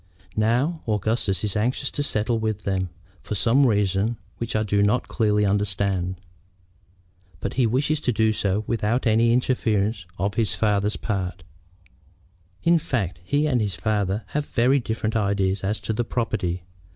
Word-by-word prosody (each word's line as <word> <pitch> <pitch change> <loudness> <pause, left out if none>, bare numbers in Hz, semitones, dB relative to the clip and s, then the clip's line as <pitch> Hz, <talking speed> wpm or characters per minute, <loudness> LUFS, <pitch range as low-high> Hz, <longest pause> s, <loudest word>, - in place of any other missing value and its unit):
Now, 125 +10 +1
Augustus 105 -2 0
is 105 -1 0
anxious 125 +5 0
to - - -2
settle 115 -4 +1
with 110 -2 -2
them, 95 -2 -1 0.3
for 105 - -4
some 120 +7 +4
reason 105 +1 +1 0.2
which 115 -1 -3
I 110 - +2
do 100 -1 +1
not 105 +5 +2
clearly 105 -2 +2
understand. 100 -2 0 1.2
But - - -3
he 125 -2 +2
wishes 145 +6 +1
to 125 - +1
do 110 -1 +2
so 105 0 0
without 115 +3 0
any 115 +1 +4
interference 110 -5 +1
on 100 +3 0
his 115 -3 +1
father's 105 -1 +1
part. 95 -6 -3 1.2
In 170 0 +4
fact, 100 - -2
he 145 - +1
and 130 -6 +2
his 100 -3 0
father 105 -1 -1
have 150 0 -2
very 130 +3 +3
different 110 -2 -2
ideas 100 -2 +1
as 105 +3 -1
to 110 - -2
the 120 +3 0
property. 110 -7 -2
110 Hz, 155 wpm, -24 LUFS, 100-120 Hz, 1.2 s, some